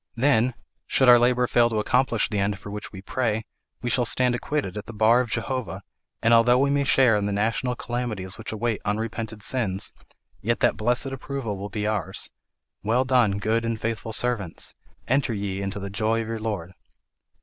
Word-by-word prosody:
Then, 120 -1 +2 0.3
should 130 - +3
our 120 -1 +9
labour 125 +1 +3
fail 120 -1 +3
to 110 - -2
accomplish 120 +1 +2
the 105 - -2
end 100 0 0
for 100 0 -9
which 105 0 -6
we 95 -1 -10
pray, 110 -2 -1 0.4
we 120 - -1
shall 125 - +3
stand 125 +1 +3
acquitted 120 -5 -2
at 105 0 -6
the 120 - -8
bar 110 +3 +4
of 125 - -4
Jehovah, 115 -4 -3 0.4
and 115 +1 +5
although 120 +2 +6
we 140 +2 +2
may 140 0 +1
share 130 -4 +5
in 105 -1 0
the - - -1
national 115 +5 0
calamities 120 -7 -3
which - - -7
await 110 0 -2
unrepented 110 0 -3
sins, 105 -6 -1 0.5
yet 115 +3 0
that - - +3
blessed 120 +4 +1
approval 135 -5 -4
will 100 +1 -6
be 105 +1 -3
ours 100 -3 -2 0.5
'Well 120 +5 +1
done, 125 -6 +3
good 110 +3 0
and 115 -1 -2
faithful 115 0 -3
servants, 110 -7 0 0.3
enter 135 -3 +1
ye 100 -1 -3
into 100 0 -3
the 100 0 -6
joy 110 +3 0
of - - -8
your 115 -1 -3
Lord.'" 100 -5 -4
115 Hz, 195 wpm, -25 LUFS, 105-125 Hz, 0.5 s, our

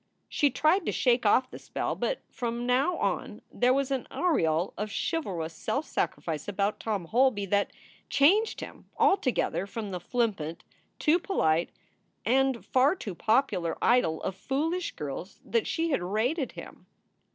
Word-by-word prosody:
She 290 - +2
tried 310 +8 +2
to - - +2
shake 240 -3 +2
off 255 +5 +3
the - - -8
spell, - - -3
but - - -2
from 240 -1 -3
now 260 +8 +2
on - - -2
there 245 +1 +3
was 275 +1 +1
an 265 -2 -1
aureole 175 - +1
of 210 +1 -3
chivalrous 180 - -2
self 275 - -2
sacrifice 155 -1 -2
about 205 +1 -1
Tom 205 -6 -2
Holby 235 +1 +2
that 200 +1 +1 0.4
changed 390 +11 +3
him - - -10
altogether 255 - +2
from 215 -1 -5
the 180 - -3
flippant, 175 -6 -2 0.3
too 325 +3 +3
polite, 170 - +1 0.6
and 265 0 +2
far 265 +6 +3
too 210 - -6
popular 215 -5 +1
idol 235 -10 +2
of - - -2
foolish 320 - -2
girls 150 +6 -6
that 230 0 0
she 330 0 0
had 275 - +1
rated 235 - -1
him. - - -11
240 Hz, 150 wpm, -28 LUFS, 195-280 Hz, 0.6 s, off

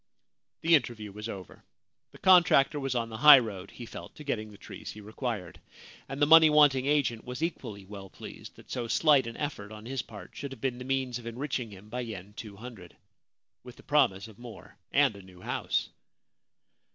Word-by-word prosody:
The 165 +1 +3
interview 120 -8 +1
was 105 +3 -7
over. 95 -4 -9 0.5
The - - -14
contractor 170 -6 +5
was 135 -2 -2
on 115 -1 -1
the 110 - -7
high 145 +4 +10
road, 100 -6 -4
he 120 - -10
felt, - - -10
to 150 - -10
getting 110 -7 -3
the 105 - -14
trees - - -10
he 110 - -11
required, 105 -4 -5 0.5
and 135 +1 -5
the 145 - +5
money 160 +1 +8
wanting 145 -3 +5
agent 140 -6 +1
was 125 +5 -5
equally 110 - -4
well 100 -1 -10
pleased - - -11
that - - -16
so 120 -2 -3
slight 140 0 +4
an 115 - -7
effort 125 -9 -5
on 110 0 -10
his 130 +1 -3
part 105 -5 -12
should 140 0 -6
have - - -12
been 125 -2 -2
the 125 - -7
means 130 -2 -1
of 115 - -10
enriching 125 0 -3
him 100 0 -13
by 120 +4 -5
yen 105 -4 -7
200, 105 -4 -10 0.7
with 125 0 -11
the - - -17
promise 105 -9 +2
of 110 -1 -16
more 120 -2 -12 0.2
and 140 -6 +3
a 100 - -11
new 95 -1 -16
house. - - -1
120 Hz, 200 wpm, -29 LUFS, 105-135 Hz, 0.7 s, high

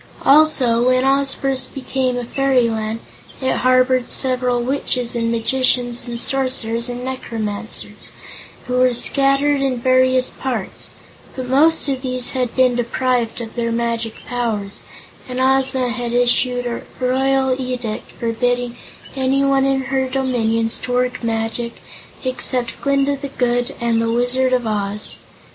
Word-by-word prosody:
Also, 265 -5 +5
when 255 +1 +2
Oz 275 0 +2
first 270 0 -1
became 260 -2 -1
a 245 - -3
fairyland, 230 -4 0 0.4
it 260 -1 0
harbored 255 0 +3
several 250 -2 +1
witches 250 -1 -1
and 230 -1 0
magicians 245 +1 0
and 235 -1 -4
sorcerers 245 -3 0
and 245 +1 -5
necromancers, 225 -5 -4 0.5
who 250 -1 -1
were 255 -1 +4
scattered 275 +3 +3
in 265 -2 0
various 255 +1 +3
parts, 240 -7 -4 0.4
but 255 -1 -5
most 300 +5 +4
of 270 -2 -1
these 255 -1 0
had 250 -3 -2
been 255 -1 +4
deprived 245 0 -1
of 225 -1 -7
their 230 -1 -2
magic 230 -1 -2
powers, 220 -5 -3 0.5
and 250 0 -3
Ozma 265 -1 +2
had 240 -1 -3
issued 245 0 +2
a 235 -1 -3 0.2
royal 265 +1 +2
edict 250 -4 -4
forbidding 245 +1 -1 0.4
anyone 270 +1 +2
in 270 0 +1
her 265 -1 +1
dominions 230 -4 0
to 250 - -4
work 250 0 0
magic 230 +1 -2 0.5
except 255 -2 0
Glinda 280 0 +1
the 280 - -5
Good 245 -2 -1
and 230 -1 +1
the 230 - 0
Wizard 245 +2 +1
of 250 -2 +1
Oz. 210 -1 -2
250 Hz, 135 wpm, -19 LUFS, 235-265 Hz, 0.5 s, Also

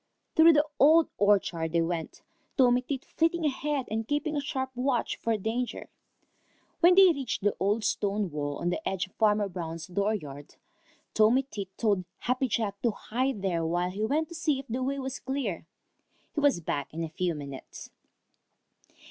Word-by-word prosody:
Through 325 +1 +8
the 300 0 +4
Old 315 +3 +6
Orchard 180 -5 +2
they 170 - +3
went, 165 -1 -4 0.3
Tommy 250 -2 +5
Tit 265 +1 -5
flitting 330 0 0
ahead 290 -1 -1
and 220 0 -2
keeping 295 +1 -1
a 290 - 0
sharp 265 -1 -3
watch 250 -1 0
for 225 -1 0
danger. 230 +4 -3 0.9
When 355 +1 +6
they 385 -1 +8
reached 270 -10 -3
the 205 - +2
old 205 +3 +1
stone 200 -3 0
wall 145 -1 -3
on 175 - -1
the 315 - -2
edge 190 0 -2
of 190 - -23
Farmer 210 -2 +2
Brown's 165 -3 -6
dooryard, 180 -7 -3 0.6
Tommy 225 +5 +4 0.3
told 200 -5 +1
Happy 255 +2 0
Jack 210 -4 -2
to 240 - +2
hide 235 +1 -2
there 170 -4 0
while 175 +2 0
he 205 +3 -3
went 300 +7 0
to - - -9
see 320 -4 0
if 270 - -7
the 245 +3 -3
way 275 +2 -1
was 265 -1 -4
clear. 250 - -3 0.7
He - - -1
was 285 -11 +3
back 145 -3 -3
in 165 +2 -4
a 165 - -4
few 175 +1 -1
minutes. 140 -2 -9
220 Hz, 175 wpm, -28 LUFS, 180-275 Hz, 0.9 s, Through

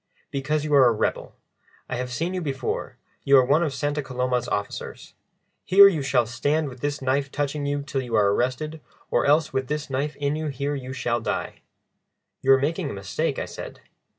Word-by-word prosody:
"Because 145 +2 -1
you 150 - -1
are 135 -3 +7
a - - +5
rebel. 110 - -2 0.5
I 125 - -3
have 125 0 -4
seen 165 +8 -2
you 185 - -2
before, 135 -5 -3 0.3
you 140 0 +6
are 130 - +5
one 145 +5 +3
of 160 -4 0
Santa 145 +2 -2
Coloma's 125 -2 -1
officers. 100 -4 -4 0.5
Here 200 +2 +8
you 170 -7 +1
shall 135 -3 +2
stand 145 +6 0
with 125 -1 -11
this 145 +1 -3
knife 135 +1 0
touching 145 0 -2
you 145 0 -1
till 140 -2 -2
you 120 -3 -3
are 100 -2 +4
arrested, 150 +7 -2 0.3
or - - +2
else 150 +2 +3
with 130 -1 -1
this 150 -1 -3
knife 140 +3 -1
in 145 +1 -1
you 155 0 -3
here 140 +1 -2
you 130 -2 -5
shall 120 -2 -1
die." - - -3 0.8
"You 135 - +3
are 135 - +5
making 155 +3 -1
a - - -5
mistake," 100 -1 -2
I - - -2
said. - - -9
140 Hz, 205 wpm, -24 LUFS, 125-150 Hz, 0.8 s, Here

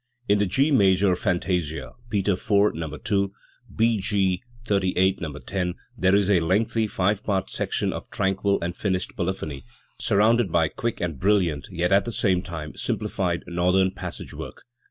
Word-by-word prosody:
In 100 0 +3
the 105 - +2
G 135 - +2
major 95 -6 +4
Fantasia 90 -4 -1 0.2
(Peters 100 -2 -1
IV, 100 0 +4
No. 80 -2 -5
u; 100 -1 +1 0.4
B. 115 -1 +2
G. 95 -2 +1 0.2
XXXVIII, 95 -2 +2
No. 75 -4 -5
10) 90 +1 -3 0.2
there 95 +1 +3
is 100 -2 +3
a 100 -3 +4
lengthy 110 +6 +1
five 100 +1 0
part 95 -2 -1
section - - -1
of - - -7
tranquil 95 +1 +1
and 85 +1 -3
finished 95 -2 -2
polyphony, 85 -7 -3 0.4
surrounded 110 0 +3
by 80 -2 +3
quick, 120 +6 -3
and 80 -6 -3
brilliant 90 -7 +1
yet 90 -1 -1
at 100 0 +4
the 120 - -3
same 95 -5 +1
time 80 -5 -7
simplified - - -2
northern 90 +2 +2
passage - - -7
work. - - -8
95 Hz, 160 wpm, -25 LUFS, 90-100 Hz, 0.4 s, major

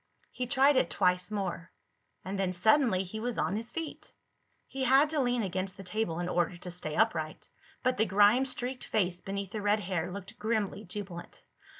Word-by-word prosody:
He 250 - -3
tried 275 +2 +4
it 170 - +3
twice 180 +1 +1
more. 195 -5 -3 0.5
And 195 +1 -3
then 185 -2 0
suddenly 220 +1 +3
he 195 +4 -6
was 240 +1 -3
on 190 - 0
his 230 +2 -3
feet. 325 +2 -6 0.5
He 270 0 -4
had 270 +4 +5
to 310 - 0
lean 245 -3 +1
against 185 0 -3
the 195 - -8
table 180 -3 -2
in 175 - -2
order 175 0 0
to 180 +1 -6
stay 155 -3 -3
upright, 160 -9 0 0.4
but 255 - +1
the 220 - +3
grime 205 +7 +5
streaked 255 0 -2
face 180 -4 0
beneath 195 -1 -4
the 215 - -4
red 205 +1 +2
hair 180 -2 -2
looked 195 0 -9
grimly 215 -2 -1
jubilant. 180 -2 -7
200 Hz, 190 wpm, -30 LUFS, 180-240 Hz, 0.5 s, had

